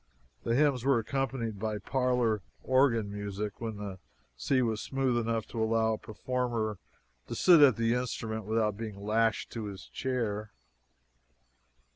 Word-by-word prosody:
The 115 - 0
hymns 140 -3 +3
were 135 -1 +4
accompanied 115 -3 -2
by 110 0 -2
parlor 125 -3 +1 0.2
organ 125 -6 +3
music 100 0 -5
when 110 -2 -4
the 100 -2 -6 0.4
sea 130 - +1
was 110 -2 -1
smooth 135 -2 0
enough 115 -1 0
to 115 - -3
allow 110 0 +2
a - - -2
performer 110 -2 -2 0.5
to - - -4
sit 170 -4 +6
at 135 -6 +7
the 115 +1 +1
instrument 115 -3 -3
without 110 -1 +1
being 105 -2 -6
lashed 110 +1 +1
to 115 -2 -4
his 100 -2 -7
chair. 110 -5 -2
115 Hz, 145 wpm, -30 LUFS, 105-125 Hz, 0.5 s, at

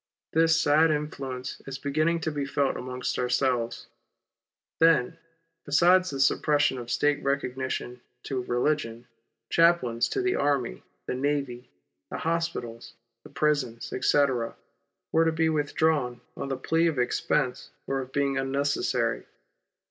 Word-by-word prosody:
This 165 0 +4
sad 155 +1 +4
influence 135 -4 -4
is 135 0 -5
beginning 155 +4 0
to 160 - -1
be 145 -1 -2
felt 140 0 0
amongst 125 0 -4
ourselves. 125 -1 0 0.9
Then, 165 -1 +3 0.4
besides 180 +5 +4
the 135 - -5
suppression 145 0 +2
of 120 -1 -8
State 145 +2 +1
recognition 130 -2 -3 0.2
to 130 -2 -3
religion, 120 -1 -1 0.5
chaplains 165 -9 +3
to 390 - -1
the 375 0 +1
army, 135 - 0 0.2
the - - -3
navy, 130 -2 -2 0.4
the - - -5
hospitals, 120 -9 -3 0.3
the - - -14
prisons, 140 -6 -1
etc., 130 -2 +1 0.6
were 165 +1 +3
to 165 - +3
be 160 0 +1
with 150 -2 -1
drawn 135 -7 +1
on 140 - -5
the 135 -1 -2
plea 165 +5 +1
of 160 -4 -1
expense 125 +1 0 0.2
or 135 - -1
of 130 0 -6
being 140 -1 0
unnecessary. 135 - -1
140 Hz, 135 wpm, -27 LUFS, 125-155 Hz, 0.9 s, This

